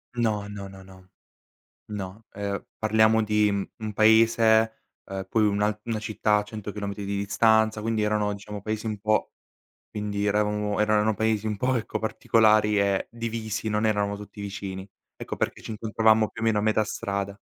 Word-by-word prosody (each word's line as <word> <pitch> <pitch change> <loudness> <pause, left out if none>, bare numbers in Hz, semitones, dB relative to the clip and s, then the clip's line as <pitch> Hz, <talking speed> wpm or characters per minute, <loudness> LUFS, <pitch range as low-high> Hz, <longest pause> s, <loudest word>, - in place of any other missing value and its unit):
No, 110 -4 0
no, 100 -1 -7
no, 95 0 -12
no. 95 -1 -17 0.8
No, 105 +1 -7
ehm, 100 -1 -3 0.2
parliamo 110 +1 +3
di, 105 0 +2
mhmm, 100 -1 -1
un 110 -1 -4
paese, 110 +1 +4 0.2
ehm, 95 0 -5
poi 110 - +2
un 100 0 0 0.2
una 115 -2 -2
città 105 0 +1
a 105 - 0
100 105 0 -7
chilometri 100 -1 -5
di 100 +1 -2
distanza, 110 +2 +3
quindi 110 0 -1
erano 105 -1 +1
diciamo 105 0 -8
paesi 110 +2 -4
un 110 -1 -2
po' 110 0 +1 0.6
quindi 105 -1 -3
eravamo 105 0 0
erano 105 0 +2
paesi 110 0 0
un 105 -1 -2
po' 130 +4 +1
ecco 115 - -2
particolari 110 -1 +3
e 100 -1 +1
divisi, 115 -2 -4
non 105 +1 0
eravamo 100 -1 0
tutti 105 0 -10
vicini. 95 -1 -6 0.3
Ecco - - -6
perché - - -2
ci - - -6
incontravamo 110 0 +2
più 115 - -9
o - - 0
meno 110 -2 +3
a - - -1
metà 110 0 +2
strada. 100 -1 -4
105 Hz, 175 wpm, -26 LUFS, 100-110 Hz, 0.8 s, paese